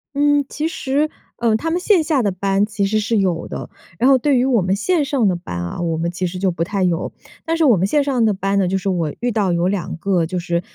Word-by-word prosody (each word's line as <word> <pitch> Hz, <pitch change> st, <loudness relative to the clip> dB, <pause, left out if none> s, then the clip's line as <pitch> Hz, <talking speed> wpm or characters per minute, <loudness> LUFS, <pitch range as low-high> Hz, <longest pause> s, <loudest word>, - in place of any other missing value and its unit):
嗯， 290 Hz, 0 st, +3 dB
其 305 Hz, +2 st, -3 dB
实， 300 Hz, -2 st, -1 dB, 0.3 s
呃， 230 Hz, -2 st, +2 dB
他 325 Hz, +9 st, -2 dB
们 345 Hz, -, 0 dB
线 365 Hz, -2 st, +3 dB
下 305 Hz, -4 st, +1 dB
的 210 Hz, -, +1 dB
班 195 Hz, +2 st, 0 dB
其 210 Hz, -2 st, -1 dB
实 215 Hz, +2 st, +1 dB
是 220 Hz, +2 st, 0 dB
有 180 Hz, -4 st, 0 dB
的。 -, -, -6 dB, 0.3 s
然 245 Hz, -, +2 dB
后 270 Hz, -, +7 dB
对 280 Hz, +1 st, +2 dB
于 245 Hz, -, +2 dB
我 250 Hz, -5 st, +2 dB
们 185 Hz, +2 st, +1 dB
线 320 Hz, -, +1 dB
上 270 Hz, -6 st, +1 dB
的 185 Hz, -, +1 dB
班 175 Hz, -, -7 dB
啊， 85 Hz, -, -4 dB
我 165 Hz, -2 st, -1 dB
们 170 Hz, +1 st, -1 dB
其 180 Hz, +1 st, -2 dB
实 180 Hz, +1 st, -6 dB
就 185 Hz, 0 st, +1 dB
不 165 Hz, -1 st, -2 dB
太 195 Hz, +2 st, -1 dB
有。 175 Hz, -1 st, 0 dB, 0.3 s
但 330 Hz, 0 st, 0 dB
是 325 Hz, -, +3 dB
我 250 Hz, -6 st, +6 dB
们 190 Hz, +1 st, +1 dB
线 290 Hz, +7 st, +2 dB
上 265 Hz, -4 st, +1 dB
的 220 Hz, -, +3 dB
班 195 Hz, 0 st, 0 dB
呢， 190 Hz, -, +2 dB
就 190 Hz, +2 st, 0 dB
是 195 Hz, +1 st, -5 dB
我 170 Hz, -5 st, -1 dB
遇 245 Hz, 0 st, 0 dB
到 205 Hz, -4 st, +1 dB
有 170 Hz, +1 st, +1 dB
2 185 Hz, -4 st, -2 dB
个 180 Hz, -1 st, +1 dB
就 180 Hz, +2 st, -4 dB
是， 170 Hz, -1 st, -1 dB
200 Hz, 290 characters per minute, -19 LUFS, 180-270 Hz, 0.3 s, 后